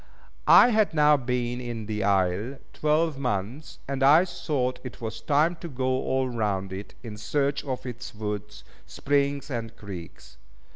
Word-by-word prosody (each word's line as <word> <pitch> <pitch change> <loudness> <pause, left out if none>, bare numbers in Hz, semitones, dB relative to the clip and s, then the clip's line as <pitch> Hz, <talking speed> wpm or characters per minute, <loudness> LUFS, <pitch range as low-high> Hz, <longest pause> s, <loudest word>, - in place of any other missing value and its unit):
I 245 - +9
had 215 -7 +2
now 150 0 +6
been 125 -2 -2
in 120 -3 -5
the 105 -1 -2
isle 100 +6 +1 0.2
twelve 155 -1 +1
months, 125 +4 -3
and 135 0 -3
I 150 +6 +7
thought 130 -8 -2
it 125 - -8
was 110 -1 -5
time 155 +4 +2
to 170 - -7
go 130 -4 -3
all 130 0 0
round 100 -5 -2
it, 100 +2 -8
in 110 -3 -7
search 140 +6 -1
of 130 -2 -4
its 125 -2 -7
woods, 105 -1 -5 0.2
springs, 140 0 0
and 115 -2 -4
creeks. 95 -5 -10
125 Hz, 155 wpm, -26 LUFS, 105-140 Hz, 0.2 s, I